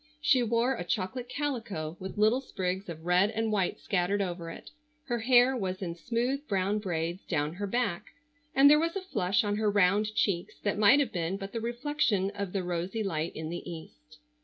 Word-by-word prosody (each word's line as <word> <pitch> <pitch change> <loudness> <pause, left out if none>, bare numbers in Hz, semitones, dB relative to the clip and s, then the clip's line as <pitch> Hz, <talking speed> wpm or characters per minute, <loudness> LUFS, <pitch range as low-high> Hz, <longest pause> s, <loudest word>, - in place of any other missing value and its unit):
She 265 -4 +4
wore 235 +2 +2
a 230 - -4
chocolate 220 +7 -3
calico 230 - -3
with 190 +2 -7
little 220 +5 +3
sprigs 190 -6 -3
of 160 -1 -8
red 180 +3 +4
and 225 0 -1
white 195 -4 0
scattered 195 +1 0
over 175 -3 -3
it, - - -10 0.3
her 240 -6 -2
hair 245 +2 +5
was 190 -5 -3
in 175 -3 -3
smooth 245 - -2
brown 200 +1 0
braids 175 -2 -3
down 150 -2 -1
her 200 +3 -4
back, 235 -5 -1 0.5
and 275 +1 +7
there 300 +1 +7
was 330 +2 -1
a 390 - -2
flush 200 - 0
on 205 0 -1
her 215 -1 +2
round 205 +2 +2
cheeks 180 -4 0
that 205 0 0
might 215 +7 +7
have 275 -6 +1
been 175 +1 -2
but 195 0 -7
the 230 - -4
reflection 235 -5 0
of 200 -2 -4
the 195 -1 -2
rosy 180 +5 -2
light 165 -4 -2
in 160 0 -5
the 175 - -4
East. - - -12
200 Hz, 200 wpm, -29 LUFS, 180-235 Hz, 0.5 s, and